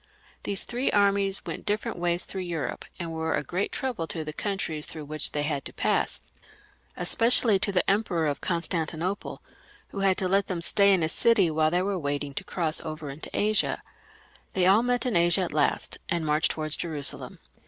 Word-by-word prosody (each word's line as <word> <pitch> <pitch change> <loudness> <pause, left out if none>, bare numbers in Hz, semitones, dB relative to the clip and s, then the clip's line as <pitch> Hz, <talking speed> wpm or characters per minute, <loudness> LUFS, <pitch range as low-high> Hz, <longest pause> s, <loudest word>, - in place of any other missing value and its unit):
These 200 -1 -1
three 245 +2 -1
armies 200 -1 +2
went - - -6
different 205 -3 -2
ways 175 0 0
through 190 - -5
Europe, 170 -4 -4
and 170 -2 -5
were 160 0 -1
a - - -2
great 180 +8 -2
trouble 245 -12 -3
to 160 -1 -5
the 155 - -5
countries 165 -6 -3
through 155 -2 -6
which 155 0 -1
they 145 - 0
had 145 -2 -1
to - - -6
pass, - - 0 0.8
especially 230 -3 +5
to 200 - +3
the 180 -2 +1
Emperor 195 -5 +1
of 145 -2 -2
Constantinople, 170 +2 -2 0.5
who 200 - -6
had 195 -1 +3
to 185 - 0
let 195 +2 +1
them 175 -3 -3
stay 200 +3 +5
in 185 -4 +3
his 160 - 0
city 210 -8 +3
while 155 0 +2
they 175 +2 +1
were 195 -1 -1
waiting 145 -1 -3
to - - -4
cross 165 -3 -2
over 155 -3 -6
into 140 +3 -6
Asia. 215 +1 +1 0.7
They 185 -2 +2
all 195 +4 +6
met 245 0 0
in 245 - 0
Asia 170 +2 +4
at 180 - -2
last, 150 -1 0
and 170 -3 0
marched 150 +1 +2
towards 155 -1 0
Jerusalem. 155 -5 -2
175 Hz, 195 wpm, -26 LUFS, 155-200 Hz, 0.8 s, all